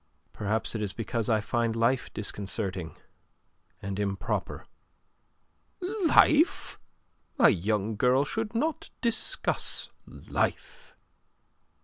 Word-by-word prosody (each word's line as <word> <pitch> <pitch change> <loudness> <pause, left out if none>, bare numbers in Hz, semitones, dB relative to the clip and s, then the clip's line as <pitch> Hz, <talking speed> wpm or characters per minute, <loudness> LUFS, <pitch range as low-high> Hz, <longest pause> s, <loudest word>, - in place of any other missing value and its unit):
"Perhaps 110 +2 -1
it 110 - -3
is 100 -3 -2
because 115 0 -2
I 110 -2 +3
find 115 +1 0
life 115 +2 +1
disconcerting 95 -5 -3 0.9
and 100 0 -4
improper." 100 -1 -2 1.1
"Life? 360 -4 +3 0.6
A 240 - +7
young 105 +3 -1
girl 130 +4 +3
should 225 +4 -3
not 320 +6 -1
discuss 235 - 0 0.2
life." - - -4
115 Hz, 90 wpm, -28 LUFS, -, 1.1 s, A